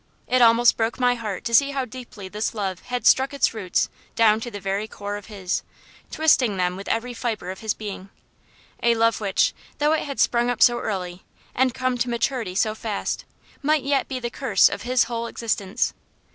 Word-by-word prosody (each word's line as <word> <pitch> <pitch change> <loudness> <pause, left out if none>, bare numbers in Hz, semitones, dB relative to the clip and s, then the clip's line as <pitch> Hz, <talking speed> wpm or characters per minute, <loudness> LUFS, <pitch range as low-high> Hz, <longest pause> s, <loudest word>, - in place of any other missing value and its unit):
It 255 0 +2
almost 235 0 +6
broke 225 +2 -1
my 250 -1 +4
heart 215 -6 -5
to 235 - -4
see 280 +4 +6
how 270 -2 -1
deeply 235 -5 -9
this 210 +4 -3
love 190 -4 -2
had 250 0 -3
struck 270 +2 +4
its 280 - +2
roots 195 -5 0 0.3
down 220 -1 +4
to 240 - -5
the 205 -3 -7
very 195 +2 -2
core 205 -1 -6
of 205 -1 -8
his; 195 -4 -3 0.5
twisting 255 -10 +3
them 180 0 0
with 195 +1 -8
every 245 +2 -1
fibre 220 -7 -3
of 190 - -9
his 220 -2 -2
being. 200 -2 -7 0.7
A 235 0 +3
love 230 0 +2
which, 200 -2 +2 0.2
though 300 +1 +2
it 315 - 0
had 280 -2 -6
sprung 240 0 +3
up 245 - +3
so 240 -1 +5
early, 180 -3 -4 0.3
and 255 -1 +1
come 255 -1 -1
to 245 +1 0
maturity 235 -4 -1
so 215 +2 +1
fast, 220 -2 -3 0.4
might 300 -1 +2
yet 275 -1 +1
be 260 -2 -4
the 240 -1 -4
curse - - +4
of - - -5
his 250 0 +2
whole 235 0 -3
existence. 220 -1 -1
230 Hz, 200 wpm, -23 LUFS, 205-250 Hz, 0.7 s, almost